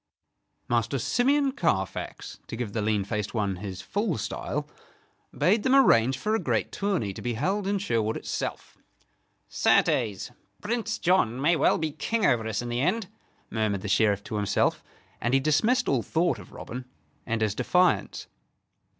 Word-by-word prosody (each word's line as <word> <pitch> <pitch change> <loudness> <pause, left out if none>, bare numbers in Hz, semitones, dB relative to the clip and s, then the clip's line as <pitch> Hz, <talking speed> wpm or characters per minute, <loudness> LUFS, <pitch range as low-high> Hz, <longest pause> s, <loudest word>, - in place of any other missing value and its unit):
Master - - 0
Simeon 275 +3 +2
Carfax, 95 - -2
to - - -5
give 115 -3 -4
the 110 - -1
lean 105 -1 +1
faced 105 +2 -3
one 100 -4 0
his 95 -1 -7
full 205 - -1
style, 105 - -3 0.6
bade 190 +9 +2
them 260 +4 +3
arrange 130 - +5
for 215 +11 -1
a 220 - +2
great - - -1
tourney 190 - -1
to - - -8
be 120 -1 -2
held 190 - -1
in 200 0 +1
Sherwood 115 - -1
itself. - - -5 0.7
"Certes, 105 -5 +1 0.3
Prince 225 +1 -2
John 165 -10 +2
may 160 +5 +3
well - - +3
be 160 -1 -2
King 225 +7 -1
over 115 -2 +2
us 110 +1 -2
in 120 - -5
the 120 +1 -1
end," 185 +5 0 0.4
murmured 110 -3 0
the 105 - -5
Sheriff 100 -1 +2
to 105 - -4
himself; 100 -1 +1 0.4
and 120 +3 +1
he - - +5
dismissed 155 - +2
all 130 -4 +2
thought 165 +8 0
of - - -13
Robin 125 +2 -7 0.4
and 115 -1 -1
his 105 -2 +1
defiance. 180 +10 +1
125 Hz, 165 wpm, -27 LUFS, -, 0.7 s, arrange